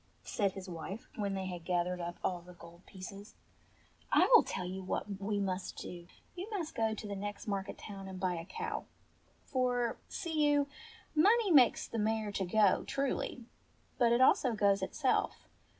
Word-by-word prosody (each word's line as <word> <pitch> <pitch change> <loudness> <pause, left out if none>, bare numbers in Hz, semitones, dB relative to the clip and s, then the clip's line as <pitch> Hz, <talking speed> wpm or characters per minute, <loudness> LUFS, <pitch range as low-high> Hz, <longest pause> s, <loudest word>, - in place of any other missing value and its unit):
said 200 -3 0
his 190 -1 -8
wife 180 +4 -6
when 200 -2 -1
they 190 0 -3
had 180 -2 -5
gathered 180 0 0
up 170 0 -4
all 180 -2 0
the 180 +1 -14
gold 170 +1 -14
pieces, 195 +2 -9 0.4
" - - -32 0.3
I - - +6
will 465 - +10
tell 185 - -4
you 190 +1 -4
what 195 +1 -3
we 205 +1 -1
must 190 -1 -2
do. 175 -1 -7 0.3
You 370 +4 -6
must 370 -8 -3
go 220 -1 0
to 215 - -7
the 200 - -4
next 205 +1 -5
market 200 -1 -2
town 195 -2 -8
and 190 -1 -7
buy 185 -1 +1
a 165 -1 -5
cow; 450 - -4 0.6
for, 245 -3 0
see 320 -3 -1
you, 290 -1 +3 0.5
money 410 +6 +4
makes 260 -7 +6
the 230 - -3
mare 215 0 0
to 195 -1 -1
go, 200 +1 +4
truly; 270 -3 -2 0.5
but 235 -2 +5
it 235 +2 +4
also 260 -1 +5
goes 200 -1 +3
itself. - - 0
200 Hz, 180 wpm, -33 LUFS, 185-245 Hz, 0.6 s, will